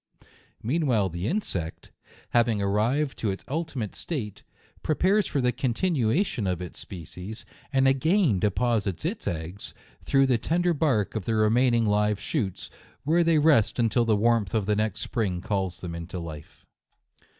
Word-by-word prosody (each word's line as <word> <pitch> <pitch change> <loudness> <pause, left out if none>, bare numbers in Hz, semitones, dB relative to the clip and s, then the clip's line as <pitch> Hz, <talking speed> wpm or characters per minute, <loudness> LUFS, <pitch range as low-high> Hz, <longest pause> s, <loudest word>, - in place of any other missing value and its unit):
Meanwhile 125 - +1
the 85 +3 -4
insect, 95 - -3 0.4
having 115 -3 +3
arrived 115 +9 0
to 110 - 0
its 95 - -5
ultimate 140 - -3
state, 120 - -5 0.4
prepares 190 +7 +2
for 140 - -1
the 125 0 +2
continuation 130 - 0
of 90 -2 -1
its 90 -2 -7
species, 90 +4 -8 0.3
and 135 -1 +3
again 140 - +3
deposits 105 -3 0
its - - -3
eggs, 85 +4 -5 0.3
through 135 0 +3
the 125 -3 +2
ten 170 +7 0
der 175 -1 +3
bark 140 -10 +1
of 110 -5 -4
the 115 - 0
remaining 115 +2 +3
live 105 0 +2
shoots; 100 - -3 0.3
where 165 +4 +3
they 165 -1 +3
rest 150 -7 +4
until 120 0 +2
the 115 -2 +2
warmth 115 -1 +2
of 105 -3 +1
the 105 +1 +1
next 105 -1 -1
spring 100 -8 -1
calls 95 -2 -2
them 85 -2 -5
into 85 +2 -6
life. 80 -4 -9
110 Hz, 155 wpm, -26 LUFS, 100-135 Hz, 0.4 s, rest